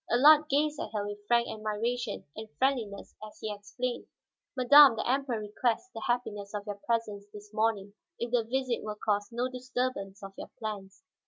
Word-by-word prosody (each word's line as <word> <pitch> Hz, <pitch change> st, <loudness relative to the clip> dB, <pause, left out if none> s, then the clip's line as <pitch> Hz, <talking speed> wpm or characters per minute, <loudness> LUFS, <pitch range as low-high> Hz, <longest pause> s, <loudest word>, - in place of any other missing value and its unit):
Allard 300 Hz, +6 st, +6 dB
gazed 295 Hz, +1 st, +1 dB
at -, -, -3 dB
her 205 Hz, -1 st, -1 dB
with 205 Hz, 0 st, -7 dB
frank 235 Hz, 0 st, +3 dB
admiration 220 Hz, +2 st, -3 dB
and 220 Hz, 0 st, -7 dB
friendliness 240 Hz, -7 st, -1 dB
as 215 Hz, -, -10 dB
he 215 Hz, -1 st, -3 dB
explained: 220 Hz, +5 st, -4 dB, 0.5 s
"Madame, 270 Hz, 0 st, +8 dB
the 220 Hz, -, -2 dB
Emperor 260 Hz, -1 st, +1 dB
requests 230 Hz, -, -1 dB
the 225 Hz, -, -6 dB
happiness 210 Hz, -4 st, -2 dB
of 205 Hz, -1 st, -4 dB
your 205 Hz, -1 st, -6 dB
presence 215 Hz, -4 st, -1 dB
this 205 Hz, 0 st, -12 dB
morning, 215 Hz, -2 st, 0 dB, 0.2 s
if 235 Hz, 0 st, -4 dB
the 245 Hz, -2 st, +3 dB
visit 250 Hz, +1 st, -1 dB
will 215 Hz, -1 st, -5 dB
cause 205 Hz, -1 st, -1 dB
no 240 Hz, +2 st, -1 dB
disturbance 250 Hz, -6 st, -3 dB
of 195 Hz, 0 st, -8 dB
your -, -, -7 dB
plans." 200 Hz, -3 st, -6 dB
225 Hz, 175 wpm, -30 LUFS, 205-250 Hz, 0.5 s, Madame